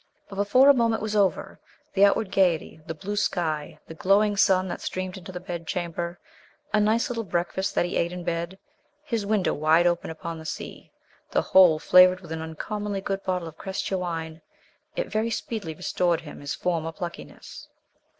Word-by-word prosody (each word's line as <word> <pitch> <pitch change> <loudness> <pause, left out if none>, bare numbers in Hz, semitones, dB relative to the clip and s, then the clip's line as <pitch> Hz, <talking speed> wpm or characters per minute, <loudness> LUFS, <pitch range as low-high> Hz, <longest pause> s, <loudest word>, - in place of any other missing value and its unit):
But, 195 - -8
before 205 +7 +5
a 285 - +9
moment 230 -4 +1
was 215 0 -2
over, 200 -3 +1 0.3
the 200 0 +6
outward 200 0 +1
gaiety, 175 -5 +1
the 165 - -4
blue 200 +6 -5
sky, 160 -7 -1
the - - -9
glowing 200 +5 +3
sun 190 -2 +3
that 175 - -5
streamed 185 0 -4
into 185 -1 -9
the 180 - -6
bedchamber, 175 -1 -4 0.5
a 215 - +4
nice 215 +3 +2
little 230 -2 -3
breakfast 180 +1 -2
that - - +2
he 175 - -2
ate 170 0 0
in 180 0 -6
bed, 170 +2 -3 0.5
his 230 -9 -2
window 210 -3 +1
wide 155 +3 +3
open 175 -1 +1
upon 160 +1 -6
the - - -9
sea, - - -7 0.4
the - - +1
whole 180 -4 +6
flavoured 180 +3 +6
with 170 -3 -12
an 160 0 -3
uncommonly 200 +6 -4
good 195 0 -3
bottle 180 -3 -2
of 160 - -12
Crescia 190 0 -3
wine 165 -2 -4 0.5
it - - -1
very 220 +1 -1
speedily 215 -7 -4
restored 175 +1 0
him 150 - -10
his 145 +1 -4
former 165 -1 -1
pluckiness. 170 +1 -8
180 Hz, 180 wpm, -26 LUFS, 165-200 Hz, 0.5 s, a